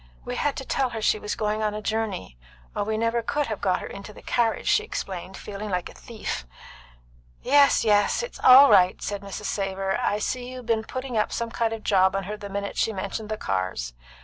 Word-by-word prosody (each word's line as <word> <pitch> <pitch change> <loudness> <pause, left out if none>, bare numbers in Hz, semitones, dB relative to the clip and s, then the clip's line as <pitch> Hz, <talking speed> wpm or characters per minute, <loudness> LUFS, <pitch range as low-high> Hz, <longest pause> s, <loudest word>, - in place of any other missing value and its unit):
"We - - -4
had 290 -2 0
to 270 - -6
tell 265 -1 0
her 225 -2 -5
she 215 - +3
was 210 - -3
going 215 0 -1
a 210 0 -1
journey, 215 - -3 0.4
or - - 0
we 215 +1 -1
never 230 +1 +1
could 295 +5 -1
have 215 -5 -5
got 185 -2 +1
her - - -5
into 200 +2 -8
the - - -14
carriage," 230 -2 0
she 435 - +4
explained, 190 - -5
feeling 210 +1 -6
like 180 -2 -2
a - - -13
thief. 220 - -5 1.0
"Yes, 285 +1 +5
yes. 205 - +3
It's 485 - -7
all 265 +2 +9
right," 180 0 +5
said 205 -1 -4
Mrs. 200 +1 -7
Savor. 195 -1 -1
"I 205 - +1
see 245 +4 -3
you'd 255 -1 -8
be'n 220 -1 0
putting 255 -2 -4
up 210 - 0
some 230 -1 -3
kind 230 -1 0
of 225 -1 -5
job 190 -1 +3
on 195 - -1
her 210 +3 -5
the 205 -1 -8
minute 200 0 -4
she 225 - +2
mentioned 200 +2 -4
the 215 - -2
cars. 95 - -2
215 Hz, 220 wpm, -25 LUFS, 195-230 Hz, 1.0 s, all